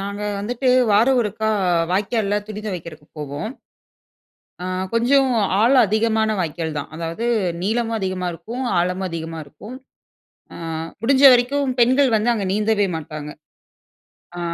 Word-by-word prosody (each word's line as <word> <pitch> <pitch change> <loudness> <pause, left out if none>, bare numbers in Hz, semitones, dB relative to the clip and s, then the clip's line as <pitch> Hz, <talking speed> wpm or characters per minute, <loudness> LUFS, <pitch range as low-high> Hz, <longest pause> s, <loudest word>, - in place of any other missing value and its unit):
நாங்க 200 +1 -5 0.2
வந்துட்டு 245 +5 -2 0.2
வாரம் 245 +5 +4
ஒருக்கா 220 0 -2 0.4
வாய்க்கால்ல 205 +1 0
துணி 215 0 -6
துவைக்கிறதுக்கு 165 -6 -7
போவோம். 145 +7 -5 1.1
அ - - -4 0.3
கொஞ்சம் 260 +3 +3 0.3
ஆழம் 250 +3 +5
அதிகமான 220 +1 +1
வாய்க்கால் 160 -2 -3
தான். 140 - -6
அதாவது 165 +7 -4 0.4
நீளமும் 225 +2 0
அதிகமா 185 -1 -2
இருக்கும், 220 +10 -6 0.2
ஆழமும் 180 +2 -1
அதிகமா 165 0 -5
இருக்கும். 205 - -11 0.8
அ - - -10 0.5
முடிஞ்ச 265 +3 +3
வரைக்கும் 260 +2 +1
பெண்கள் 255 +1 +4
வந்து 225 +3 +2
அங்க 205 -4 -2
நீந்தவே 210 -1 +1
மாட்டாங்க. 150 -1 -7 1.1
அ - - -4
210 Hz, 125 wpm, -21 LUFS, 175-235 Hz, 1.1 s, ஆழம்